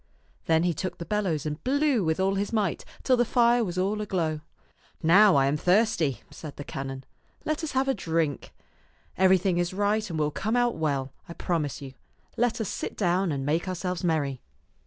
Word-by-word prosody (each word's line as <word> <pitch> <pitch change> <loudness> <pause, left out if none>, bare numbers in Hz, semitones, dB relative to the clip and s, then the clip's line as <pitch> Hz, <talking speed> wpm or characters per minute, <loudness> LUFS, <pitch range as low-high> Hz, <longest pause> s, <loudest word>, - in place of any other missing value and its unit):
Then 160 0 +3
he 175 -1 +1
took 180 +3 -4
the 170 - -6
bellows 180 -6 -1
and 150 0 -4
blew 275 -3 +2
with 160 +1 0
all 190 +1 +2
his 200 +1 -2
might 210 -6 0 0.2
till 255 - +4
the 240 - +4
fire 240 0 +3
was 180 -4 -4
all 200 +3 0
aglow. 165 -7 -1 0.3
" - - -44 0.3
Now 190 +5 +6
I 135 -1 +4
am 140 +2 +1
thirsty," 180 - +2
said 155 -3 -9
the 145 - -7
canon. 135 -1 -6 0.4
Let 310 +1 -1
us 310 - -3
have 265 +1 +1
a 270 - +3
drink. 165 - -2 0.6
Everything 185 -1 +3
is 175 +1 -1
right 205 +1 0
and 165 - -4
will 150 -1 0
come 220 +9 -2
out 245 -1 +2
well, 140 -4 -2 0.2
I - - -6
promise 155 -5 -2
you. 135 -1 -9 0.4
Let 240 -1 +1
us 220 - -2
sit - - -5
down 185 -2 +1
and 135 -2 -3
make 160 +5 0
ourselves 180 -1 -3
merry." 145 -6 0
180 Hz, 200 wpm, -27 LUFS, 155-210 Hz, 0.6 s, Now